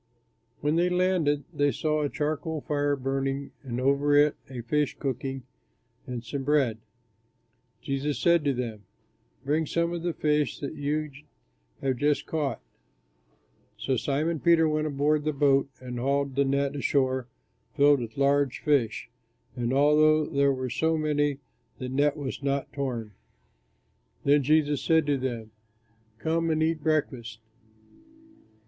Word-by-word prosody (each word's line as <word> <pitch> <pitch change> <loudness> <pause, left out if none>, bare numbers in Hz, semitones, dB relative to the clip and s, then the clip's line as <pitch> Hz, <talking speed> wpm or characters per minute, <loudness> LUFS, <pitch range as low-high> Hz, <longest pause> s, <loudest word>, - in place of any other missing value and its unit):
When 150 +3 +1
they 175 +1 +3
landed, 180 -5 +1
they 145 0 +2
saw 155 +4 0
a 145 - 0
charcoal 155 +1 -2
fire 145 -1 0
burning, 135 +1 -2
and 125 -3 -4
over 140 +2 +2
it 145 0 +5
a 125 -3 -6
fish 145 +5 0
cooking, 135 -1 -3 0.6
and 125 -2 -5
some 135 +4 -4
bread. 135 -6 +2 1.0
Jesus 140 0 -2
said 170 +2 +3
to 140 - +2
them, 115 -4 -4 0.6
"Bring 155 +2 +1
some 170 +2 0
of 170 - -3
the 170 -2 -2
fish 150 -2 +1
that 140 - -5
you 150 0 -2 0.7
have 130 -2 0
just 145 +2 +1
caught." 145 -7 -2 1.2
So 130 - -1
Simon 150 +6 -1
Peter 165 +1 +4
went 155 0 0
aboard 145 +1 +1
the 155 0 0
boat 140 -1 +3
and 125 -1 -6
hauled 140 +2 0
the 140 0 +3
net 140 +1 0
ashore 130 -3 0 0.5
filled 145 -1 +5
with 115 0 -7
large 140 -1 +2
fish; 140 -8 +1 0.5
and 120 -1 -1
although 150 +2 +4
there 140 -2 +2
were 130 -2 -3
so 160 +5 +1
many, 145 -2 0 0.4
the 130 - -5
net 145 +3 +1
was 140 -1 -5
not 140 0 -2
torn. 125 -6 -3 1.1
Then 145 +1 +4
Jesus 150 +1 +2
said 160 -2 +3
to 145 -1 +1
them, 120 -4 -4 0.7
"Come 165 +6 0
and 155 0 +1
eat 160 -1 0
breakfast." 130 -8 -1
145 Hz, 140 wpm, -27 LUFS, 135-155 Hz, 1.2 s, it